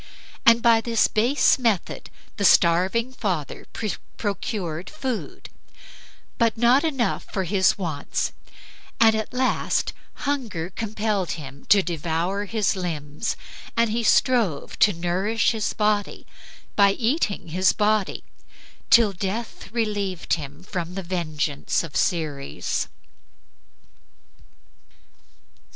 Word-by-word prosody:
By 230 -1 +5
this 230 -1 +2
base 245 +6 +3
method 225 -7 -1 0.3
the 205 - -2
starving 190 +8 +4
father 180 - -3 0.5
procured 190 -5 -3
food; 265 -7 -5 0.9
but 230 -2 +2
not 240 +4 +4
enough 270 -9 -1
for 190 - -1
his 190 +1 +2
wants, 160 -7 -2 0.7
and 225 -1 +6
at 220 0 -2
last 255 +1 0 0.3
hunger 225 - -2
compelled 210 -2 -2
him 140 -3 -9
to 200 -2 +5
devour 170 +4 -2
his 210 -1 0
limbs, 160 -1 -3 0.4
and 230 -1 +3
he 235 +2 0
strove 225 - +2
to 210 - +6
nourish 185 +6 0
his 220 -2 -1
body 210 -1 0 0.5
by 200 -1 +5
eating 225 - -1
his 185 +3 +3
body, 210 -2 0 0.7
till 225 -4 +6
death 200 +5 -5
relieved 205 -6 -1
him 145 0 -4
from 180 -1 -5
the 195 - -4
vengeance 155 -5 -1
of 160 -4 -9
Ceres. 150 -5 -1
200 Hz, 105 wpm, -24 LUFS, 170-225 Hz, 0.9 s, and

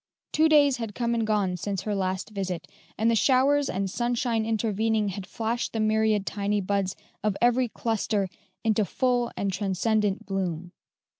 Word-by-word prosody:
Two 315 +1 +4
days 285 -3 +5
had 225 -4 -5
come 235 -1 0
and 225 -2 0
gone 200 -4 +1
since 195 +1 -3
her 210 - -2
last 190 +1 -2
visit, 185 -4 -3 0.3
and 225 +2 +3
the - - +3
showers 275 +4 +3
and 195 +1 -1
sunshine 235 +1 0
intervening 220 -1 +1
had 190 -1 -6
flashed 230 +3 -2
the 225 - -2
myriad 215 -1 +2
tiny 205 0 -1
buds 195 -1 -1 0.3
of 210 -2 0
every 245 +1 +3
cluster 220 -3 -1 0.4
into 220 -1 +2
full 245 +3 0
and 195 -1 -1
transcendent 205 +1 0
bloom. 180 -3 -3
215 Hz, 160 wpm, -26 LUFS, 195-235 Hz, 0.4 s, days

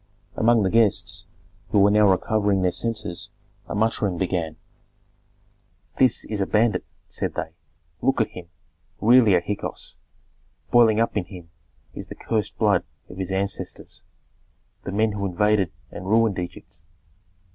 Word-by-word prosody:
Among 115 -1 +3
the 95 - 0
guests, 95 -5 +2 0.4
who 100 -1 +5
now 105 0 +5
were 95 - +6
recovering 100 0 +1
their 90 - +2
senses, 105 -2 -3 0.4
a - - -5
muttering 105 -4 0
began. 85 -3 -2 1.4
"This 130 -1 +3
is 105 -2 -3
a 95 - 0
bandit!" 110 +1 +2 0.2
said - - -4
they. 80 - -4 0.5
"Look 135 -1 +1
at 110 - +1
him, 90 -2 -10 0.5
really 115 -3 +6
a 90 - +3
Hyksos. 105 +3 -5 0.7
Boiling 115 -3 +5
up 115 - 0
in 100 -4 -1
him 90 -3 -12 0.4
is - - -8
the - - -9
cursed 110 -3 -2
blood - - +3 0.3
of - - -11
his 95 -1 -3
ancestors, 95 +1 -4 0.8
the - - -4
men 110 +2 +1
who 100 -1 -2
invaded 100 0 +1 0.2
and 95 - -8
ruined 110 -2 +2
Egypt. 90 -3 -8
100 Hz, 145 wpm, -24 LUFS, 95-110 Hz, 1.4 s, were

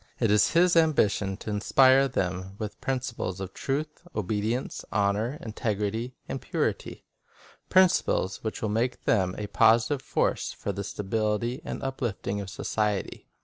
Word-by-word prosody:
It 115 -4 +2
is 105 - +4
his 175 +1 +4
ambition 105 - +2
to 110 - -6
inspire 130 +6 +5
them 95 -5 -3
with 105 -1 -6
principles 125 -8 -3
of 95 -1 -6
truth, 150 +3 -3
obedience, 110 +4 -2
honor, 105 +6 0
integ 110 -2 -2
rity, 110 +5 -2
and - - -4
purity, - - -2 0.3
— - - -26
principles 185 - +3
that 110 - -4
will 110 - 0
make 120 +4 -1
them 95 -4 +2
a 105 - -3
positive 115 +6 +3
force 130 - -1
for 100 - -4
the 100 +1 -4
stability 110 +6 -1
and - - -5
uplifting 115 -6 -3
of 95 - -7
society. 105 0 -2
110 Hz, 145 wpm, -27 LUFS, 100-130 Hz, 0.3 s, inspire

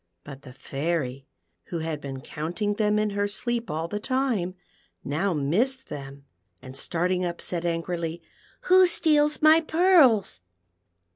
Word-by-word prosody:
But 140 -2 -10
the 130 -3 -12
Fairy, 135 -1 -3 0.4
wlio 165 -2 -3
had 160 -2 -4
been 135 -2 -6
counting 175 +10 -3
them 210 0 +1
in 215 0 0
her 205 0 0
sleep 235 +3 -3
all 160 +2 -2
the 205 +4 -4
time, 235 -7 -1 0.5
now 160 +8 -1
missed 230 - 0
them, 140 0 -8 0.3
and 130 0 -11
starting 180 +5 -1
up, 175 -1 -3
said 175 -1 -3
angrily, 170 0 -3 0.2
" - - -31
Who 370 0 +6
steals 300 -3 +2
my 315 +1 +7
pearls 315 - +4
180 Hz, 145 wpm, -26 LUFS, 150-240 Hz, 0.5 s, my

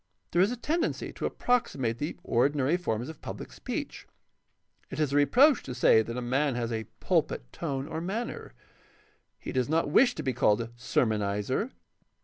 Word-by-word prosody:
There 175 - +3
is 200 +5 +4
a 250 - -3
tendency 330 +7 -1
to - - -2
approxi 245 -10 0
mate 115 -3 -1
the 150 - -3
ordinary 140 +5 +2
forms 120 -9 -2
of 160 - -9
public - - -7
speech. - - -5 0.8
It - - -6
is 150 -3 +1
a - - +1
reproach 245 - +5
to 125 - -7
say 110 - +5
that 115 +2 -5
a 125 - -3
man 135 +2 +1
has 120 -1 -2
a 110 -1 -2
pulpit - - 0
tone 140 -4 -3
or 160 - -4
manner. 210 - -4 0.8
He - - -7
does 130 0 0
not 160 -2 +1
wish 245 - +5
to - - -4
be 130 - 0
called 105 -3 +3
a 115 - -3
sermonizer. 110 - 0
135 Hz, 180 wpm, -29 LUFS, 120-175 Hz, 0.8 s, reproach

